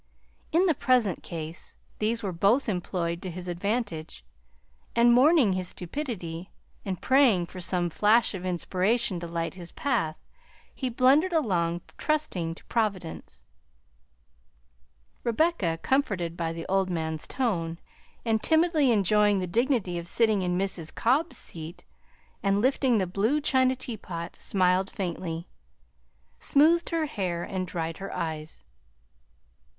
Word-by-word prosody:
In 345 Hz, +4 st, +4 dB
the 340 Hz, -, +4 dB
present 250 Hz, -, +2 dB
case 165 Hz, 0 st, -7 dB, 0.2 s
these 225 Hz, +2 st, 0 dB
were 195 Hz, -, -1 dB
both 200 Hz, +10 st, +2 dB
employed 175 Hz, -3 st, -2 dB
to 185 Hz, -, -5 dB
his 180 Hz, +1 st, -6 dB
advantage, 175 Hz, -, -3 dB, 0.7 s
and 235 Hz, +1 st, +6 dB
mourning 260 Hz, -, +5 dB
his 185 Hz, -1 st, -2 dB
stupidity 180 Hz, -, -5 dB, 0.3 s
and 190 Hz, -3 st, -3 dB
praying 255 Hz, -10 st, +4 dB
for 185 Hz, +1 st, -9 dB
some 180 Hz, 0 st, 0 dB
flash 215 Hz, +8 st, +3 dB
of 185 Hz, -2 st, -6 dB
inspiration 185 Hz, +3 st, 0 dB
to 170 Hz, -, -6 dB
light 165 Hz, 0 st, -3 dB
his 175 Hz, -3 st, -9 dB
path, 235 Hz, -, -1 dB, 0.6 s
he 260 Hz, -, -3 dB
blundered 275 Hz, +9 st, +4 dB
along, 175 Hz, -, +1 dB, 0.2 s
trusting 185 Hz, -, -1 dB
to -, -, -17 dB
Providence. 185 Hz, -, -3 dB, 1.8 s
Rebecca, 235 Hz, -, +1 dB
comforted 195 Hz, -12 st, 0 dB
by 165 Hz, -1 st, -2 dB
the 165 Hz, 0 st, -6 dB
old 190 Hz, 0 st, +1 dB
man's 160 Hz, -3 st, -3 dB
tone, 175 Hz, -11 st, -1 dB, 0.5 s
and 220 Hz, -1 st, +1 dB
timidly 320 Hz, -3 st, +3 dB
enjoying 210 Hz, -1 st, +3 dB
the 185 Hz, -, -1 dB
dignity 220 Hz, -3 st, 0 dB
of 170 Hz, -, -7 dB
sitting 215 Hz, 0 st, +3 dB
in 180 Hz, -1 st, 0 dB
Mrs. 185 Hz, -4 st, -2 dB
Cobb's 285 Hz, +8 st, +1 dB
seat 165 Hz, +1 st, -7 dB, 0.6 s
and 195 Hz, -2 st, +2 dB
lifting 255 Hz, 0 st, +2 dB
the 190 Hz, -, +1 dB
blue 205 Hz, +11 st, +1 dB
china 260 Hz, -3 st, +2 dB
teapot, 185 Hz, -9 st, -6 dB
smiled 185 Hz, 0 st, +1 dB
faintly, 170 Hz, -3 st, -4 dB, 0.9 s
smoothed 325 Hz, +4 st, +3 dB
her 330 Hz, -2 st, 0 dB
hair, 180 Hz, -, -3 dB
and 185 Hz, -1 st, -3 dB
dried 165 Hz, 0 st, -4 dB
her 195 Hz, -, -6 dB
eyes. 155 Hz, -1 st, -5 dB
195 Hz, 130 wpm, -27 LUFS, 170-245 Hz, 1.8 s, and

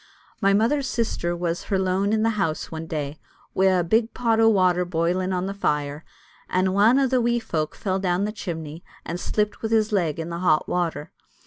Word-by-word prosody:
My 195 Hz, -, +4 dB
mother's 235 Hz, +7 st, +2 dB
sister 195 Hz, -8 st, -1 dB
was 170 Hz, 0 st, -2 dB
her 195 Hz, -, 0 dB
lone 190 Hz, +2 st, +1 dB
in 220 Hz, 0 st, +2 dB
the 225 Hz, -, +3 dB
house 190 Hz, -8 st, -2 dB
one 160 Hz, 0 st, -6 dB
day, 150 Hz, -2 st, -4 dB, 0.3 s
wi' 190 Hz, -, +2 dB
a' 185 Hz, -2 st, +3 dB
big 220 Hz, +6 st, +1 dB
pot 230 Hz, -2 st, +1 dB
o' 225 Hz, 0 st, +6 dB
water 185 Hz, -4 st, +3 dB
boiling 175 Hz, +2 st, -1 dB
on 180 Hz, 0 st, -1 dB
the 195 Hz, -, -3 dB
fire, 150 Hz, -5 st, -2 dB, 0.5 s
and 185 Hz, +1 st, +1 dB
ane 210 Hz, +6 st, +4 dB
o' 275 Hz, -, +3 dB
the 255 Hz, -1 st, +2 dB
wee 240 Hz, 0 st, +1 dB
folk 160 Hz, -9 st, -3 dB
fell 190 Hz, -2 st, -2 dB
down 185 Hz, +1 st, 0 dB
the 210 Hz, -, -2 dB
chimney, 165 Hz, -6 st, -6 dB, 0.2 s
and 170 Hz, +2 st, -4 dB
slipped 210 Hz, +2 st, -1 dB
wi' 220 Hz, -, -2 dB
his 220 Hz, -1 st, +2 dB
leg 170 Hz, -7 st, 0 dB
in 165 Hz, +1 st, -4 dB
the 170 Hz, -, -4 dB
hot 165 Hz, -4 st, +2 dB
water. 165 Hz, -4 st, -2 dB
185 Hz, 210 wpm, -24 LUFS, 170-215 Hz, 0.5 s, o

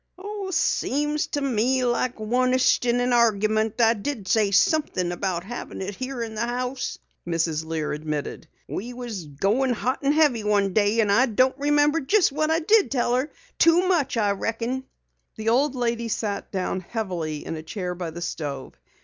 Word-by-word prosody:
"Seems 295 Hz, -4 st, 0 dB
to 290 Hz, -, -3 dB
me 255 Hz, 0 st, +1 dB
like 245 Hz, +1 st, 0 dB
onest 255 Hz, +3 st, +2 dB
in 240 Hz, +1 st, +2 dB
an 245 Hz, 0 st, +1 dB
argument 220 Hz, -1 st, +2 dB
I 225 Hz, -1 st, +5 dB
did 220 Hz, -1 st, -5 dB
say 215 Hz, 0 st, +3 dB
somethin' 195 Hz, -, +2 dB
about 175 Hz, -1 st, -2 dB
having 240 Hz, +5 st, -7 dB
it 195 Hz, +2 st, -4 dB
here 255 Hz, +2 st, -4 dB
in 225 Hz, -1 st, -6 dB
the 215 Hz, -, -3 dB
house," 250 Hz, +1 st, -3 dB, 0.3 s
Mrs. 160 Hz, -2 st, 0 dB
Lear 160 Hz, -1 st, -3 dB
admitted. 150 Hz, +1 st, -4 dB, 0.2 s
"We 240 Hz, +5 st, -5 dB
was 230 Hz, -9 st, -6 dB
goin' 200 Hz, -, 0 dB
it -, -, +2 dB
hot 255 Hz, +4 st, -1 dB
and 280 Hz, -, +2 dB
heavy 290 Hz, -8 st, +3 dB
one 200 Hz, -2 st, +1 dB
day, 215 Hz, +1 st, +3 dB
an' 205 Hz, -2 st, +1 dB
I 250 Hz, +6 st, +4 dB
don't 255 Hz, +3 st, +2 dB
remember 295 Hz, +2 st, +2 dB
jest 355 Hz, +6 st, +3 dB
what 310 Hz, +2 st, 0 dB
I 325 Hz, +1 st, +2 dB
did 420 Hz, +5 st, +4 dB
tell 240 Hz, -3 st, 0 dB
her. 260 Hz, +4 st, 0 dB, 0.3 s
Too 340 Hz, +2 st, +5 dB
much, 310 Hz, -10 st, +1 dB
I 205 Hz, -2 st, +2 dB
reckon." 230 Hz, +6 st, -2 dB, 0.5 s
The 220 Hz, 0 st, -2 dB
old 270 Hz, +4 st, +2 dB
lady 235 Hz, -1 st, -1 dB
sat 210 Hz, -2 st, -3 dB
down 190 Hz, -1 st, -2 dB
heavily 175 Hz, -7 st, -4 dB
in -, -, -4 dB
a 155 Hz, -, -6 dB
chair 180 Hz, +2 st, -4 dB
by 175 Hz, -1 st, -5 dB
the 170 Hz, +2 st, -6 dB
stove. 140 Hz, -5 st, -5 dB
230 Hz, 180 wpm, -24 LUFS, 195-260 Hz, 0.5 s, I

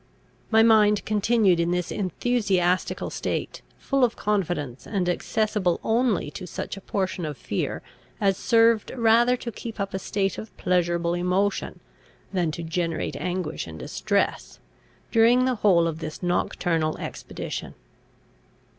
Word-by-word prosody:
My 220 Hz, 0 st, +5 dB
mind 210 Hz, -2 st, +4 dB
continued 210 Hz, -3 st, +3 dB
in 170 Hz, 0 st, +1 dB
this 180 Hz, 0 st, -1 dB
enthusiastical 190 Hz, -2 st, 0 dB
state, -, -, -3 dB, 0.2 s
full 275 Hz, -1 st, 0 dB
of 240 Hz, -, +2 dB
confidence, 175 Hz, -, -2 dB
and 195 Hz, -4 st, -1 dB
accessible 205 Hz, 0 st, 0 dB
only 225 Hz, -, +1 dB
to 180 Hz, +4 st, -7 dB
such -, -, -5 dB
a 195 Hz, -, -10 dB
portion 190 Hz, -2 st, -2 dB
of 150 Hz, -3 st, -4 dB
fear 100 Hz, -, -3 dB, 0.4 s
as 195 Hz, -2 st, +2 dB
served 230 Hz, +1 st, +3 dB
rather 235 Hz, +1 st, +4 dB
to 235 Hz, -, -6 dB
keep 225 Hz, 0 st, -8 dB
up 200 Hz, 0 st, -3 dB
a 190 Hz, -, -2 dB
state 195 Hz, +1 st, -1 dB
of 220 Hz, -, -10 dB
pleasurable 175 Hz, -1 st, +1 dB
emotion 180 Hz, +3 st, -1 dB, 0.5 s
than 175 Hz, -4 st, +1 dB
to 160 Hz, +2 st, -5 dB
generate 165 Hz, 0 st, -2 dB
anguish 180 Hz, -, -3 dB
and 80 Hz, -1 st, -8 dB
distress, -, -, -1 dB, 0.5 s
during 235 Hz, +3 st, +5 dB
the 255 Hz, -, +2 dB
whole 175 Hz, -5 st, +5 dB
of 165 Hz, -1 st, -2 dB
this 155 Hz, +2 st, -7 dB
nocturnal 165 Hz, -2 st, 0 dB
expedition. -, -, -6 dB
190 Hz, 135 wpm, -25 LUFS, 175-220 Hz, 0.5 s, My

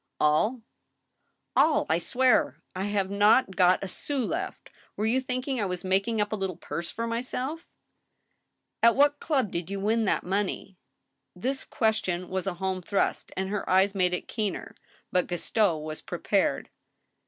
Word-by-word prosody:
" -, -, -54 dB
All, 210 Hz, +11 st, +2 dB, 0.9 s
I 170 Hz, -, +3 dB
swear! 250 Hz, +6 st, +2 dB, 0.2 s
I 190 Hz, +1 st, -2 dB
have 200 Hz, -2 st, -1 dB
not 205 Hz, 0 st, +4 dB
got 180 Hz, 0 st, +4 dB
a -, -, -3 dB
sous 265 Hz, +6 st, -2 dB
left. 370 Hz, +3 st, -4 dB, 0.3 s
Were 210 Hz, -, 0 dB
you 245 Hz, +4 st, +2 dB
thinking 255 Hz, 0 st, -2 dB
I 200 Hz, -, 0 dB
was 180 Hz, 0 st, -4 dB
making 195 Hz, +4 st, +1 dB
up 210 Hz, 0 st, 0 dB
a -, -, 0 dB
little 190 Hz, -3 st, -3 dB
purse 165 Hz, +3 st, -5 dB
for 230 Hz, -, -3 dB
myself? 255 Hz, +7 st, -3 dB, 0.4 s
" -, -, -49 dB
" -, -, -54 dB
At 230 Hz, 0 st, +6 dB
what 290 Hz, +1 st, +4 dB
club 270 Hz, -, 0 dB
did 170 Hz, +1 st, -4 dB
you 200 Hz, 0 st, -3 dB
win 220 Hz, +3 st, +1 dB
that -, -, +1 dB
money? 195 Hz, 0 st, -2 dB, 0.3 s
" -, -, -53 dB
This 265 Hz, +1 st, 0 dB
question 190 Hz, -6 st, -1 dB
was 190 Hz, +1 st, -2 dB
a 185 Hz, -, -1 dB
home 190 Hz, 0 st, -2 dB
thrust, 195 Hz, +3 st, -1 dB
and 190 Hz, 0 st, -1 dB
her 205 Hz, 0 st, -3 dB
eyes 190 Hz, +2 st, +4 dB
made 180 Hz, -2 st, +2 dB
it -, -, -7 dB
keener. 210 Hz, -4 st, -3 dB, 0.4 s
But 180 Hz, -, +2 dB
Gaston 175 Hz, -1 st, +1 dB
was 155 Hz, 0 st, -6 dB
prepared. -, -, 0 dB
200 Hz, 175 wpm, -27 LUFS, 185-235 Hz, 0.9 s, At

